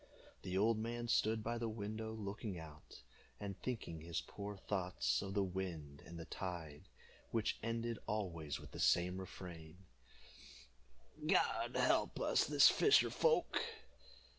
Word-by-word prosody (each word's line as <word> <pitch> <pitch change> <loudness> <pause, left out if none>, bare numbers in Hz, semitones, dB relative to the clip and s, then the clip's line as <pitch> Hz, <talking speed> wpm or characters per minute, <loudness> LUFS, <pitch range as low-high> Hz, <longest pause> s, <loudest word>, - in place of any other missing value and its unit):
The 95 0 -2
old 110 +2 +3
man 120 +1 -3
stood 110 -1 +2
by 115 +1 -1
the 115 -1 -1
window 110 +1 -4
looking 105 -2 -4
out, 80 -6 -11 0.4
and 100 -2 -4
thinking 110 -10 -4
his 85 0 -2
poor 100 0 -6
thoughts 95 -2 0
of 95 0 -5
the 100 - +3
wind 90 -7 -4
and 85 - -8
the 80 - -6
tide, 80 -6 -6 0.4
which 110 -2 0
ended 115 0 -2
always 85 -9 -2
with - - -11
the - - -8
same 90 +1 +3
refrain, 85 -3 -8 1.5
"God - - +2
help - - +3
us - - +3 0.3
fisher 420 - +5
folk!" 480 0 +3
100 Hz, 135 wpm, -38 LUFS, 85-110 Hz, 1.5 s, fisher